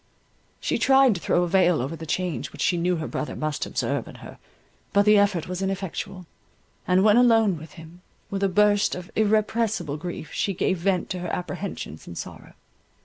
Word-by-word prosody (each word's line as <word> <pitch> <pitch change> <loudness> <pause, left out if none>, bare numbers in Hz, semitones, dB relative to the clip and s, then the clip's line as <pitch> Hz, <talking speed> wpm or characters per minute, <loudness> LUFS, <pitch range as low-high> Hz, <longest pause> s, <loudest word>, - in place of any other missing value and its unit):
She - - -1
tried 270 -2 +5
to 175 - -6
throw 175 - +2
a - - 0
veil 180 -2 +3
over 135 +6 -3
the 160 0 -9
change 180 +1 -2
which - - -4
she 180 - +2
knew 175 +1 +1
her 160 -2 -4
brother 150 - -4
must 155 -1 -3
observe - - -2
in - - -11
her, - - -12 0.5
but 200 0 +4
the 210 -1 +6
effort 200 -5 +1
was 180 +1 -4
ineffectual; 190 -1 -4 0.6
and 185 +1 +4
when 215 +1 +5
alone 225 -5 +4
with 160 0 -11
him, 170 +1 -13 0.3
with 195 0 -2
a 195 - +2
burst 205 +1 +3
of 180 -1 -9
irrepressible 215 -6 +1
grief 165 -1 -7
she 195 - -1
gave 190 -1 0
vent 185 0 0
to 185 - -3
her 175 -1 -4
apprehensions 180 - -5
and 85 - -8
sorrow. - - -9
185 Hz, 195 wpm, -25 LUFS, 170-205 Hz, 0.6 s, the